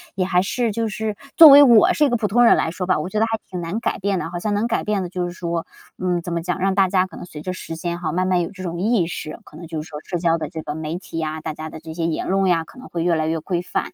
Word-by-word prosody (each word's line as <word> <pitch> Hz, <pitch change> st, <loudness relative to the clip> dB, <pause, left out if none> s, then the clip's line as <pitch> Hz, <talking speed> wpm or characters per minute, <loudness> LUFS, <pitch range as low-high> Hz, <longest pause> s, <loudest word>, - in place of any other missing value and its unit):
也 185 Hz, -1 st, 0 dB
还 180 Hz, -1 st, +2 dB
是 225 Hz, +4 st, -1 dB
就 225 Hz, +2 st, -1 dB
是 215 Hz, 0 st, -3 dB, 0.2 s
作 325 Hz, -3 st, +11 dB
为 285 Hz, +1 st, +10 dB
我 235 Hz, -6 st, +6 dB
是 300 Hz, -, +3 dB
一 -, -, +2 dB
个 240 Hz, -, +1 dB
普 220 Hz, -2 st, -1 dB
通 240 Hz, +4 st, +3 dB
人 -, -, +7 dB
来 160 Hz, -, 0 dB
说 180 Hz, +1 st, -4 dB
吧， 185 Hz, -, +2 dB
我 155 Hz, -, -4 dB
觉 210 Hz, -, -1 dB
得 220 Hz, -, +3 dB
还 225 Hz, 0 st, -1 dB
挺 180 Hz, -, -5 dB
难 170 Hz, +6 st, -3 dB
改 -, -, -1 dB
变 195 Hz, 0 st, 0 dB
的。 165 Hz, -, -4 dB
好 175 Hz, 0 st, -5 dB
像 210 Hz, +3 st, -1 dB
能 205 Hz, +3 st, 0 dB
改 235 Hz, -, -1 dB
变 210 Hz, -2 st, -1 dB
的 180 Hz, -, -5 dB
就 180 Hz, 0 st, -3 dB
是 175 Hz, -, -4 dB
说 170 Hz, -2 st, -3 dB, 0.3 s
嗯， 180 Hz, -1 st, -1 dB
怎 175 Hz, -, -6 dB
么 170 Hz, -, -1 dB
讲， 180 Hz, +2 st, -3 dB
让 195 Hz, +1 st, +1 dB
大 195 Hz, -1 st, +4 dB
家 185 Hz, 0 st, +2 dB
可 -, -, -12 dB
能 -, -, -8 dB
随 155 Hz, -4 st, -10 dB
着 185 Hz, -, -4 dB
时 165 Hz, -3 st, -7 dB
间 170 Hz, +1 st, -4 dB
哈 160 Hz, -3 st, -2 dB
慢 185 Hz, +1 st, 0 dB
慢 185 Hz, -1 st, +2 dB
有 170 Hz, -, -4 dB
这 185 Hz, -2 st, -9 dB
种 170 Hz, -1 st, -4 dB
意 210 Hz, -4 st, +2 dB
识。 155 Hz, -2 st, -6 dB
可 150 Hz, -, -14 dB
能 170 Hz, 0 st, -9 dB
就 160 Hz, -1 st, -4 dB
是 155 Hz, -, -11 dB
说 150 Hz, -1 st, -7 dB
社 180 Hz, -, -3 dB
交 165 Hz, -1 st, +1 dB
的 155 Hz, -3 st, -5 dB
这 160 Hz, 0 st, -6 dB
个 150 Hz, -, -5 dB
媒 160 Hz, +1 st, -4 dB
体 180 Hz, -2 st, -9 dB
呀， 155 Hz, 0 st, -3 dB
大 155 Hz, -, -4 dB
家 155 Hz, +1 st, -7 dB
的 -, -, -9 dB
这 160 Hz, 0 st, -9 dB
些 165 Hz, 0 st, -2 dB
言 165 Hz, -, -2 dB
论 195 Hz, +1 st, +1 dB
呀 170 Hz, -3 st, +2 dB
可 -, -, -17 dB
能 255 Hz, -, -11 dB
会 170 Hz, -, -3 dB
越 175 Hz, -1 st, +2 dB
来 155 Hz, -1 st, 0 dB
越 160 Hz, 0 st, -1 dB
规 175 Hz, +2 st, -2 dB
范。 180 Hz, -, -3 dB
180 Hz, 365 characters per minute, -21 LUFS, 165-200 Hz, 0.3 s, 作